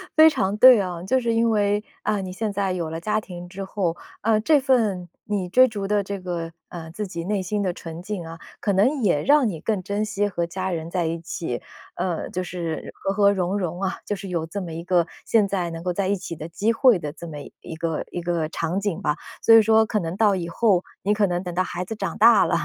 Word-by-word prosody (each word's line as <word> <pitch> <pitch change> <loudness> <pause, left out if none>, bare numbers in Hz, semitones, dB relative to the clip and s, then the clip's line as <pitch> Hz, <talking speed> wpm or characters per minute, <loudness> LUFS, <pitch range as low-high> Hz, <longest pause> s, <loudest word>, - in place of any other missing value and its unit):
非 315 0 +9
常 195 -9 0
对 255 -1 +9
啊。 180 -3 -4
就 260 +8 +2
是 235 -2 0
因 230 0 +3
为， 205 -1 +1 0.2
啊， 205 -2 0
你 185 - -5
现 215 +2 -2
在 195 -2 -1
有 170 -3 -3
了 160 +1 -4
家 215 +4 0
庭 175 -2 -9
之 195 +2 -7
后， 190 -3 -2 0.3
啊， 220 0 +3
这 290 +6 +4
份 220 -10 +1 0.2
你 200 -3 -2
追 255 +8 +6
逐 205 -4 -4
的 205 -1 +1
这 200 0 -5
个， 175 -2 -4 0.2
呃， 165 -2 -8
自 210 +4 -4
己 170 -2 -5
内 200 +1 -1
心 205 +3 -2
的 185 - 0
纯 165 0 -8
净 195 -3 -4
啊， 165 0 -8 0.2
可 200 - 0
能 255 +9 +2
也 175 -9 +2
让 285 -3 +5
你 165 -5 -5
更 215 -4 -1
珍 200 +3 -2
惜 205 -1 0
和 175 -4 -2
家 185 +2 -4
人 165 -1 -4
在 175 -1 -1
一 165 +1 -2
起， 165 -7 -4 0.3
呃， 175 -3 -2
就 185 - -3
是 170 -3 -5
和 195 - -3
和 200 0 +4
融 190 0 0
融 175 -1 -3
啊， 190 -1 -1
就 205 - -2
是 195 0 -8
有 170 -3 -2
这 200 +5 -5
么 170 -3 -6
一 165 +1 -5
个 175 -2 +2 0.2
现 215 -3 +3
在 185 -3 -1
能 165 0 -6
够 180 - -1
在 190 +1 -1
一 200 - +2
起 180 -2 -6
的 155 +2 -7
机 210 +7 0
会 230 -5 +5
的 150 -2 -5
这 170 - -9
么 150 -2 -7 0.2
一 165 - -8
个 165 -1 -2
一 175 - -4
个 170 -2 -1
场 165 +3 -2
景 200 -4 -2
吧。 150 - +1 0.3
所 225 - +6
以 225 - +9
说 220 +1 +4
可 215 -1 -1
能 170 +1 -4
到 210 -2 +4
以 170 -2 -3
后， 190 -1 +2 0.2
你 205 - +2
可 210 -1 +2
能 175 -1 -1
等 175 -1 -5
到 185 - +2
孩 180 0 -4
子 220 - -5
长 - - -4
大 230 -4 +7
了， - - +1
190 Hz, 275 characters per minute, -23 LUFS, 170-210 Hz, 0.3 s, 非